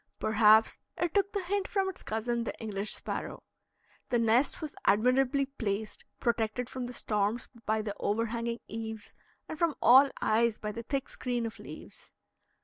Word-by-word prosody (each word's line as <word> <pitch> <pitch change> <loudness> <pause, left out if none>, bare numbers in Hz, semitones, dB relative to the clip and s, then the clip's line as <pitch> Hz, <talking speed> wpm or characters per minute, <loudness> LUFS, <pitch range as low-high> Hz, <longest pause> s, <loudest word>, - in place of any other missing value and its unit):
Perhaps 220 0 +5 0.2
it 345 -2 -1
took 400 0 +2
the 400 -3 -2
hint 395 +2 -1
from 390 -2 0
its 380 - -6
cousin, 235 +2 -2
the - - -5
English 210 -2 -3
sparrow. - - -4 0.7
The 240 - +2
nest 230 +4 +2
was 305 -2 -6
admirably 255 +6 +3
placed, 220 -6 -4
protected 235 0 -1
from 255 -1 -4
the 250 - -7
storms 210 0 -1 0.2
by 220 0 +1
the 205 -1 -3
overhanging 230 +2 -1
eaves 220 -1 -6 0.3
and 310 - -7
from 335 -4 +2
all 265 +3 +7
eyes 225 0 +2
by 210 - -4
the 230 - -6
thick 270 +3 -3
screen 245 -2 -3
of 225 - -6
leaves. - - -11
235 Hz, 160 wpm, -30 LUFS, 220-270 Hz, 0.7 s, all